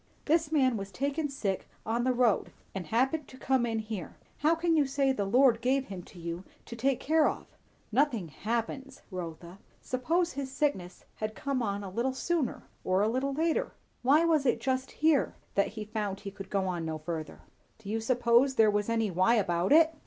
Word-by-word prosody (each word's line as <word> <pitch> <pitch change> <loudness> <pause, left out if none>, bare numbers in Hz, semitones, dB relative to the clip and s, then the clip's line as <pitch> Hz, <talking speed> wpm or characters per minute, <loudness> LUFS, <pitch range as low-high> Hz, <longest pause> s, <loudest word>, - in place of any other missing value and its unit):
"This 320 0 +2
man 260 -6 +3
was 200 0 -6
taken 285 - -1
sick 205 -9 -3 0.2
on 235 +2 0
the 255 - +3
road, 245 -4 +2 0.2
and 185 -4 -5
happened 265 - +1
to 260 - -13
come 260 -2 +1
in 225 -1 -1
here. 215 -5 -5 0.2
How 315 +3 +3
can 330 0 +1
you 295 -3 +3
say, 275 0 +2
the 205 -6 -1
Lord 240 +2 +4
gave 265 +2 +1
him 190 -2 -6
to - - -15
you 170 +1 -5 0.2
to 235 - -8
take 260 +2 +1
care 315 +1 +3
of?" - - -6 0.5
"Nothing 240 - +1
'happens,' 235 - -4
Rotha. 175 0 -7 0.2
Suppose 330 +7 0
his 275 -1 -4
sickness 230 -12 -2
had 215 0 -3
come 275 -2 -2
on 200 -2 -2
a 195 - -5
little 240 +6 0
sooner, 325 -2 -1 0.2
or 185 +2 +2
a - - +3
little 265 +4 -1
later? 320 +1 0 0.3
why 290 +6 +5
was 315 -4 +3
it 245 - +2
just 260 0 -1
here 310 -3 +2 0.2
that 200 - +2
he 215 - -4
found 210 -2 -3
he 200 - -6
could 195 -1 -9
go 190 -2 0
no 160 -1 -3
further?" 155 0 -6 0.4
"Do 220 - -14
you 220 +2 -1
suppose 240 +3 +3
there 220 -3 +5
was 205 +1 0
any 225 -3 +1
'why' 185 +7 +3
about 175 -4 +1
it?" 320 +1 +6
235 Hz, 195 wpm, -30 LUFS, 200-275 Hz, 0.5 s, it